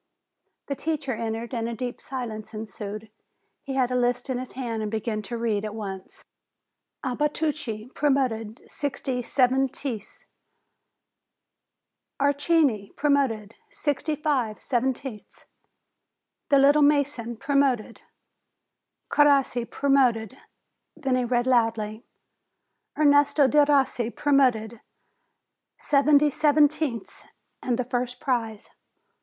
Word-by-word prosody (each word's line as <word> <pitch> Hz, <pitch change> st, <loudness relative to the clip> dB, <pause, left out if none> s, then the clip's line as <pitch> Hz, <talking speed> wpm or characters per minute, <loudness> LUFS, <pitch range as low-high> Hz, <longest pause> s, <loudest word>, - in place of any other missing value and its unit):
The 280 Hz, -, -3 dB
teacher 300 Hz, -3 st, -2 dB
entered, 225 Hz, +1 st, -4 dB
and 230 Hz, -1 st, -2 dB
a 235 Hz, -, -4 dB
deep 245 Hz, 0 st, -5 dB
silence 230 Hz, -5 st, -6 dB
ensued. 215 Hz, 0 st, -7 dB, 0.5 s
He 270 Hz, -1 st, -5 dB
had 255 Hz, -2 st, +2 dB
the -, -, 0 dB
list 245 Hz, +1 st, 0 dB
in 250 Hz, -, -1 dB
his 255 Hz, -, -8 dB
hand, 235 Hz, -4 st, -3 dB
and 215 Hz, -, -2 dB
began 220 Hz, 0 st, -2 dB
to 235 Hz, +3 st, -5 dB
read 220 Hz, -3 st, -1 dB
at 215 Hz, 0 st, -5 dB
once. 195 Hz, -3 st, -8 dB, 0.8 s
"Abatucci, 280 Hz, -4 st, -2 dB
promoted, 255 Hz, -6 st, -1 dB
sixty 265 Hz, -3 st, -3 dB
seventieths, 260 Hz, -2 st, -1 dB, 1.9 s
Archini, 285 Hz, -6 st, +1 dB
promoted, 265 Hz, -8 st, +1 dB, 0.2 s
fifty 295 Hz, +1 st, -1 dB
five 270 Hz, -8 st, -1 dB
seventieths." 255 Hz, -3 st, -3 dB, 1.0 s
The 280 Hz, -, +5 dB
"little 285 Hz, +2 st, +5 dB
mason" 285 Hz, -5 st, +1 dB
promoted; 275 Hz, -4 st, 0 dB, 1.1 s
Crossi 275 Hz, -5 st, +3 dB
promoted. 255 Hz, -6 st, +2 dB, 0.6 s
Then 265 Hz, -2 st, 0 dB
he 250 Hz, -1 st, +1 dB
read 240 Hz, 0 st, +1 dB
loudly: 225 Hz, -3 st, +1 dB, 0.9 s
"Ernesto 290 Hz, -1 st, +4 dB
Derossi, 280 Hz, -5 st, +3 dB
promoted, 240 Hz, -5 st, +1 dB, 1.0 s
seventy 290 Hz, +1 st, +3 dB
seventieths, 295 Hz, -5 st, +1 dB, 0.4 s
and 245 Hz, -2 st, -1 dB
the 250 Hz, -, -1 dB
first 250 Hz, 0 st, -3 dB
prize." 225 Hz, -5 st, -2 dB
250 Hz, 100 wpm, -25 LUFS, 225-280 Hz, 1.9 s, The